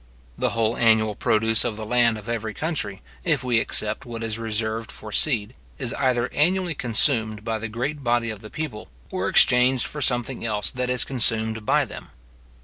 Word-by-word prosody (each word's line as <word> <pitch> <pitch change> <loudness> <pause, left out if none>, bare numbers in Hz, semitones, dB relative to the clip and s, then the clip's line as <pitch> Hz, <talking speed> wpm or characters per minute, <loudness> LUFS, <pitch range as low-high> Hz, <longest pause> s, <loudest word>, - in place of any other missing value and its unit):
The - - 0
whole 115 0 +1
annual 110 -2 +3
produce 110 +2 +2
of 120 -3 -2
the 110 0 -6
land 115 -1 +3
of 105 +1 -11
every 110 -2 -3
country, 135 - -3 0.2
if - - +1
we 120 -3 +2
except - - 0
what 115 -3 -6
is 110 0 -3
reserved 110 0 -2
for 110 - -10
seed, 115 -2 +1 0.2
is 130 -4 -1
either 125 -3 +1
annually 180 +3 +2
consumed 110 -4 +1
by 115 -1 -1
the 115 - -4
great 135 +6 -3
body 120 -2 +1
of 110 - -7
the 110 0 -11
people, 140 -8 -6 0.2
or - - -1
exchanged 125 0 +4
for 150 - -6
something 125 -1 0
else 105 -3 0
that 125 0 -3
is 125 -1 +2
consumed 110 -3 0
by - - +3
them. - - -10
115 Hz, 185 wpm, -24 LUFS, 110-125 Hz, 0.2 s, exchanged